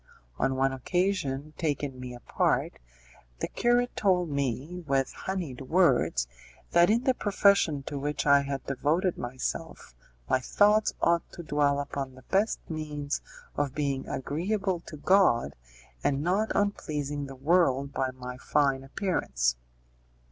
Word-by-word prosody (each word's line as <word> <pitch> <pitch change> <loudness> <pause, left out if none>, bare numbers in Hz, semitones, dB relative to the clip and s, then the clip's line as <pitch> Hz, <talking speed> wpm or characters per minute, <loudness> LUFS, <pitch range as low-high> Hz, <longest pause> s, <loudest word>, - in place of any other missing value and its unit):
On 135 0 +1
one 135 0 +2
occasion, 155 -1 -1
taking 145 -4 -2
me 125 -1 -7
apart, 120 - 0 0.6
the - - -2
curate 245 +1 +1
told 180 -5 +2
me, 140 +6 -2
with 135 -1 +1
honeyed 175 -10 -4
words, 135 - +2 0.4
that 175 0 +5
in 230 +3 +3
the 260 -1 +3
profession 200 - +3
to 140 +1 -5
which 145 +2 -2
I 140 -1 +6
had 140 -1 -4
devoted 155 +7 +1
myself 120 - -5 0.3
my 130 - +2
thoughts 210 - +3
ought 170 0 +2
to 175 - -8
dwell 145 -2 +1
upon 140 -2 -4
the 130 - -15
best 200 +8 0
means 150 -3 -3 0.3
of 140 -2 -1
being 140 -3 -1
agreeable 185 +7 -1
to 155 - -8
God, 145 - +3 0.5
and 140 0 +1
not 195 +6 +1
on 205 0 +3
pleasing 145 -5 -4
the 135 - -9
world 140 -2 +2
by 130 -1 0
my 125 -1 -8
fine 140 -2 +1
appearance. 65 - 0
145 Hz, 140 wpm, -28 LUFS, 135-180 Hz, 0.6 s, I